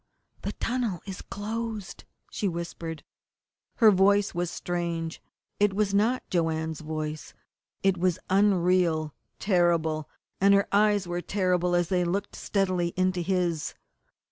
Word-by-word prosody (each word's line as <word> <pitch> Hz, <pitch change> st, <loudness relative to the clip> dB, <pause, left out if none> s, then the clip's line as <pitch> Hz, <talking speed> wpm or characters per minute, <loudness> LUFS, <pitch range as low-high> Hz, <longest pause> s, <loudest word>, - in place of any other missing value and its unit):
"The -, -, -3 dB
tunnel 230 Hz, -7 st, -2 dB
is 190 Hz, -2 st, -6 dB
closed!" 215 Hz, -1 st, -5 dB, 0.3 s
she 205 Hz, -, -1 dB
whispered. 170 Hz, -3 st, -5 dB, 0.7 s
Her 220 Hz, -3 st, +7 dB
voice 200 Hz, +1 st, +3 dB
was 175 Hz, -1 st, -1 dB
strange. 170 Hz, -2 st, -3 dB, 0.4 s
It 205 Hz, -1 st, +3 dB
was 205 Hz, -1 st, +1 dB
not 225 Hz, +5 st, +2 dB
Joanne's 160 Hz, -2 st, 0 dB
voice. 155 Hz, -1 st, -5 dB, 0.5 s
It 190 Hz, -2 st, +2 dB
was 180 Hz, -1 st, +2 dB
unreal, 180 Hz, -5 st, +2 dB, 0.2 s
terrible, 170 Hz, -5 st, +1 dB, 0.3 s
and 200 Hz, +1 st, +6 dB
her 200 Hz, -, +2 dB
eyes 205 Hz, -1 st, +3 dB
were 175 Hz, 0 st, -2 dB
terrible 180 Hz, -2 st, +1 dB
as 175 Hz, -1 st, +1 dB
they 180 Hz, -2 st, +2 dB
looked 190 Hz, +4 st, -2 dB
steadily 185 Hz, -4 st, 0 dB
into 185 Hz, -1 st, +1 dB
his. 175 Hz, -3 st, -1 dB
180 Hz, 125 wpm, -27 LUFS, 170-200 Hz, 0.7 s, Her